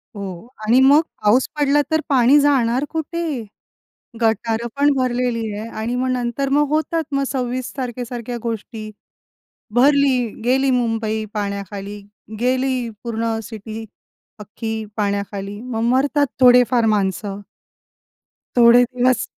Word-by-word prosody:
हो. 195 0 -7 0.2
आणि 235 +4 +4
मग 280 +3 +6 0.2
पाऊस 225 +5 +4
पडला 290 0 +3
तर 315 0 +2
पाणी 270 +1 +5
जाणार 265 -2 +2
कुठे? 325 +1 -3 1.0
गटारं 225 +1 0
पण 290 +1 +4
भरलेली 245 -3 -1
आहे 215 +2 -6
आणि 235 +2 -2
मग 255 +1 -1
नंतर 250 +2 -1
मग 295 0 +3
होतात 315 +2 0
मग 275 0 +1
26 255 -1 -3
तारखेसारख्या 245 -1 -5
गोष्टी. 225 -1 -5 0.9
भरली, 275 0 +4 0.3
गेली 265 +2 +2
मुंबई 225 -3 0
पाण्याखाली, 200 0 -4 0.4
गेली 255 0 0 0.2
पूर्ण 230 -1 -2
सिटी 220 +1 -8 0.5
अख्खी 220 +1 -5
पाण्याखाली. 200 -1 -3
मग 235 -2 -4
मरतात 285 +2 +2
थोडे-फार 245 -2 +5
माणसं. 200 0 -2 1.2
थोडे 240 +1 +7
दिवस. 250 -1 +1
240 Hz, 115 wpm, -20 LUFS, 220-260 Hz, 1.2 s, थोडे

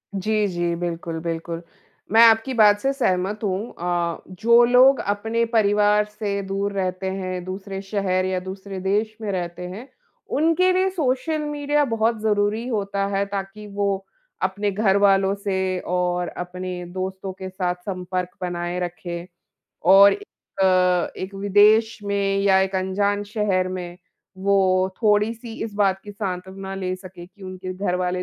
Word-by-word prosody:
जी, 210 +2 +1
जी। 175 -2 -1
बिल्कुल, 170 -1 -4
बिल्कुल। 165 0 -4 0.5
मैं 225 - +7
आपकी 225 +4 +3
बात 210 -3 +5
से 270 +5 +1
सहमत 205 -4 -1
हूँ। 200 +3 -2
अ, 175 -1 -1
जो 235 +5 +4
लोग 255 +3 +6
अपने 225 +3 -1
परिवार 210 0 +4
से 210 -1 -3
दूर 200 +1 -1
रहते 190 -1 -2
हैं 185 -2 -4
दूसरे 195 +1 -6
शहर 195 -2 -1
या 185 0 -1
दूसरे 190 +1 -7
देश 210 +3 0
में 210 -2 -2
रहते 180 -1 -4
हैं। 210 +9 -8 0.5
उनके 330 +4 +3
लिए 375 +1 +2
सोशल 310 -2 -1
मीडिया 295 0 0
बहुत 225 -2 0
ज़रूरी 215 +2 +1
होता 200 -4 -1
है। 200 +1 +1
ताकि 200 +1 -6
वो 200 -1 -2 0.4
अपने 200 +2 0
घर 195 0 +2
वालों 195 -1 +4
से 190 -2 -1
और 180 0 0
अपने 180 +1 -6
दोस्तों 190 0 -4
के 190 0 -7
साथ 180 -1 -2
संपर्क 180 -1 -4
बनाए 175 0 -3
रखें। 175 -1 -5 0.6
और 195 +3 +8
ए 410 - -5 0.4
अ, - - +5 0.5
एक 190 +1 -6
विदेश 205 +3 +4
में 200 -1 0
या 195 -1 +4
एक 190 0 -1
अनजान 200 +2 0
शहर 200 -3 0
में, 180 -1 -6 0.4
वो 190 -1 +3
थोड़ी-सी 220 +2 +1
इस 215 -2 -7
बात 195 -2 +2
की 205 - -8
सांत्वना 190 -1 -5
ले 185 -1 -2
सके 185 -2 -11
कि 190 +2 -20
उनके 185 0 -6
घर 185 -1 -1
वाले 180 0 -1
195 Hz, 155 wpm, -23 LUFS, 185-210 Hz, 0.6 s, और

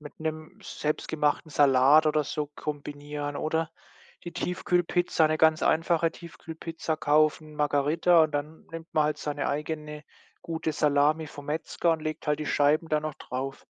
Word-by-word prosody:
mit 150 -1 -12
'nem 155 0 -5
selbst 150 0 -3
gemachten 150 0 0
Salat 140 +2 +5
oder 150 -1 +2
so 150 +1 -3
kombinieren, 145 0 -5
oder 160 0 -1 0.5
die 175 - -6
Tiefkühlpizza 175 -2 +1
'ne 155 0 0
ganz 160 0 +4
einfache 165 0 +2
Tiefkühlpizza 165 -1 -6
kaufen, 155 +1 +2
Margarita 150 +3 +3
und 155 - -4
dann 150 +2 -5
nimmt 165 0 -8
man 155 - +3
halt 150 0 -1
seine 145 -1 -2
eigene 150 0 -4 0.4
gute 160 -1 -3
Salami 150 +1 +2
vom 145 -1 -11
Metzger 160 +2 0
und 160 - -3
legt 155 0 -5
halt 150 0 0
die 150 - -3
Scheiben 150 +3 +2
da 155 - +2
noch 155 -1 -4
drauf. 135 +2 -6
155 Hz, 155 wpm, -27 LUFS, 150-160 Hz, 0.5 s, Salat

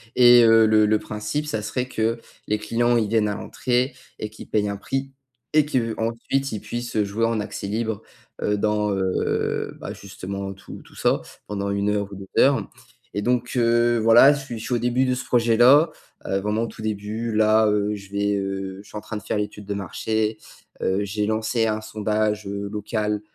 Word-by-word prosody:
et 120 -1 +8
heu, 115 -1 +6
le 110 0 +5
le 105 0 +3
principe, 105 +8 -3
ça 110 -8 -2
serait 125 +4 -3
que 115 -1 -1 0.3
les 105 - +1
clients, 120 +3 +1
ils 110 -2 +1
viennent 110 -1 +2
à 105 - -2
l'entrée 125 +5 -1 0.3
et 110 - -4
qu'ils 110 - -12
paient 105 -1 +1
un 100 0 -3
prix 135 +6 -3 0.4
et 155 -1 +5
qu'ensuite 115 +1 -1
ils 110 - -3
puissent, 120 0 -5
heu, 105 - +3
jouer 110 +3 0
en 115 -1 0
accès 105 - -5
libre, 110 0 -2 0.4
heu, 105 - +1
dans, 105 0 +1
heu, 95 -1 -1
bah, - - -6
justement 100 0 -6
tout 95 - -11
tout - - -19
ça, - - +1 0.3
pendant 100 -1 -3
1 100 +1 0
heure 100 -1 -1
ou - - -7
2 95 0 -1
heures 135 0 +3 0.4
et 105 - -2
donc 120 +2 0
heu, 120 0 +3
voilà, 115 +6 +7
je 145 - -3
suis 120 -4 -6
je - - -8
suis - - -2
au - - +3
début 125 +2 +1
de 125 -1 +1
ce 125 - -4
projet-là, 120 +6 +5 0.3
heu, 95 - 0
vraiment 105 +3 -1
au - - -2
tout 110 - -11
début, 110 +2 -3
là, 110 0 +4
heu, 105 0 +1
je 100 -1 -12
vais, 100 0 0
heu, 95 -1 -4
je - - -19
suis 105 - -8
en - - -5
train 105 +1 -6
de 105 - -8
faire - - -2
l'étude 105 0 -4
de 100 - -3
marché, 110 +3 -2 0.4
heu, 95 +2 +1
j'ai 105 +1 -1
lancé 110 +2 0
un 110 0 -1
sondage, 105 0 -1
heu, 100 0 -4
local, 105 0 -2
110 Hz, 210 wpm, -23 LUFS, 105-115 Hz, 0.4 s, et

